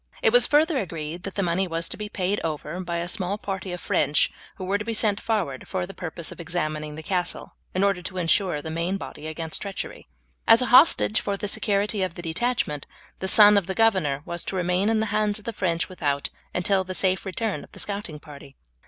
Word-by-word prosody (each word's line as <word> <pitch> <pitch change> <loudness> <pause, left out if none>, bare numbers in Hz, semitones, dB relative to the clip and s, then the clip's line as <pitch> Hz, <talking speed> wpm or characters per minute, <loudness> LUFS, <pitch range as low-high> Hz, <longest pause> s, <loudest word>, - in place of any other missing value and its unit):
It 460 -2 +4
was - - +8
further 305 0 +3
agreed 165 -4 -5
that 195 +1 -7
the 200 - 0
money 180 +2 +1
was 165 0 -2
to - - -3
be 210 0 -6
paid 195 +1 -1
over 155 +2 -3
by 170 -2 -3
a 170 +1 -2
small 195 0 -1
party 190 -2 -4
of 180 - -4
French 145 -3 +2 0.2
who 190 - -7
were 200 +2 0
to - - -3
be 225 +1 -2
sent 210 -2 +2
forward 185 - -2
for 185 -1 -2
the 195 - -10
purpose 170 -2 -4
of - - -11
examining 155 -3 -3
the 160 - -8
castle, 180 0 -2 0.2
in 185 - +2
order 200 -2 +2
to 185 +1 -6
ensure 175 -3 +1
the 160 - -5
main 170 +4 -1
body 155 -5 -8
against 160 0 -4
treachery. 200 -2 -6 0.4
As 225 0 +8
a 250 - +2
hostage 250 -5 +6
for 200 -1 -2
the 205 - -3
security 205 0 +1
of 185 -2 -1
the 175 - -8
detachment, 165 - -1 0.3
the 190 - -2
son 205 +1 +7
of 185 - -10
the 190 - -3
governor 185 -11 +2
was 170 0 -3
to - - -3
remain 180 +3 +1
in 225 -1 +2
the - - +1
hands 210 -1 +1
of 215 - -7
the 230 - -3
French 170 -4 0
without, 145 -7 -2 0.2
until 190 +2 +1
the 185 0 -5
safe 185 0 +1
return 205 +3 -3
of - - -16
the - - -10
scouting 200 -6 -4
party. 145 -2 -13
185 Hz, 230 wpm, -25 LUFS, 165-205 Hz, 0.4 s, was